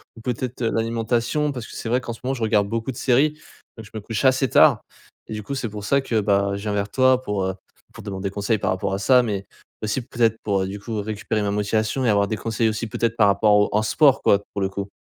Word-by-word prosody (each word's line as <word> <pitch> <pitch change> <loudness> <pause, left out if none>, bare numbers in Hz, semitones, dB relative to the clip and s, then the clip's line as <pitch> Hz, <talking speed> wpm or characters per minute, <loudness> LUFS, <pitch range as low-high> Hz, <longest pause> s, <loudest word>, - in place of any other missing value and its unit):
ou 115 - -12
peut-être, 125 +1 -4
heu, 115 - +1
l'alimentation. 115 +6 0
Parce 125 -4 -6
que - - -11
c'est 115 - -5
vrai 125 +2 +2
qu'en 120 -1 -6
ce 115 - -13
moment 135 +1 -1
je 115 - -4
regarde 105 -2 +2
beaucoup 115 +3 -2
de 120 - -11
séries, 135 +4 +3 0.5
donc 110 - -9
je - - -16
me 110 - -3
couche 110 +3 -4
assez 130 0 +3
tard - - +5 0.5
et - - -6
du 105 - -4
coup 140 - -5
c'est 120 -3 -2
pour 105 0 -8
ça 140 +6 +2
que, 115 -4 0
ben, 100 -1 +1
je 100 - -6
viens 105 -1 -2
vers 100 0 -1
toi 130 +1 +3
pour, 105 -5 -2
heu, 95 0 -2 0.4
pour - - -11
demander 95 0 -4
conseil 100 +2 -1
par - - -1
rapport 95 +1 -2
à 100 - -2
ça, 125 +4 +4
mais 100 -4 -3 0.4
aussi 110 +5 -1
peut-être 115 -2 0
pour, 100 -2 0
heu, 95 - -2
du 100 +1 -6
coup 110 0 -4
récupérer 110 +1 -3
ma 100 - -1
motivation 110 +5 0
et - - +3
avoir 100 -1 +3
des 110 +1 -3
conseils 115 0 0
aussi 110 +1 -3
peut-être 115 +1 -2
par 105 - +5
rapport 105 +1 +3
au 105 0 +3
en 105 - +3
sport 135 +5 +3
quoi, 100 0 +4
pour 100 - -3
le 95 - 0
coup. 100 +1 -5
110 Hz, 270 wpm, -22 LUFS, 100-120 Hz, 0.5 s, tard